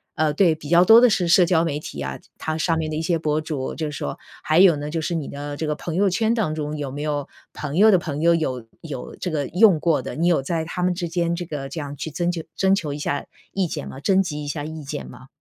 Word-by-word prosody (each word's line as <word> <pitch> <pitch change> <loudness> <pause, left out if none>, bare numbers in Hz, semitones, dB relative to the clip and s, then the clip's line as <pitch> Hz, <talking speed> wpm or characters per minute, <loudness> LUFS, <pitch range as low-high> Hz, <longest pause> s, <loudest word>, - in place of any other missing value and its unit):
呃 155 -2 +1
对， 170 +1 +4
比 150 -2 -10
较 175 +2 +6
多 225 +4 +8
的 250 - +7
是 185 -4 +1
社 175 +1 +6
交 165 -2 +3
媒 150 -3 -1
体 75 - -8
啊， 70 -1 -4 0.2
它 155 0 -3
上 165 +1 +1
面 160 -1 -2
的 - - -2
一 - - -1
些 165 +1 +1
博 155 -1 0
主。 155 0 -4 0.2
就 155 - -2
是 145 - -6
说， 70 - -4 0.3
还 155 +2 +3
有 185 -4 +7
呢， 145 +1 -5
就 165 +1 -2
是 170 +2 -2
你 155 -4 -3
的 145 0 -6
这 160 - -2
个 150 - 0
朋 165 +1 -5
友 195 +2 +3
圈 220 +5 +1
当 215 -10 0
中 150 0 -3
有 145 -3 -4
没 145 +2 -5
有 145 -2 -2 0.3
朋 150 +1 -4
友 215 +3 +7
的 190 - +6
朋 155 -4 -4
友 170 +1 +5
有 130 -7 -2 0.2
有 145 -6 -7
这 180 - -4
个 145 -3 -1
用 185 -1 +5
过 165 -1 +2
的， - - -6
你 165 +3 +1
有 170 -5 +3
在 160 +4 -2
他 180 +2 -4
们 180 0 +2
之 175 -1 -3
间 170 0 0
这 175 +1 -4
个 145 -4 -5
这 165 - -5
样 145 -1 -5
去 160 - -4
增 175 +4 0
求 170 - -4
征 190 0 +3
求 155 -7 -3
一 145 - -6
下 145 -1 -2 0.3
意 195 -2 0
见 - - -5
吗 135 - -8
征 190 +6 +3
集 150 -5 -4
一 - - -6
下 145 0 -3
意 155 0 -7
见 145 +1 -5
吗？ 125 +1 -13
160 Hz, 310 characters per minute, -23 LUFS, 145-175 Hz, 0.3 s, 多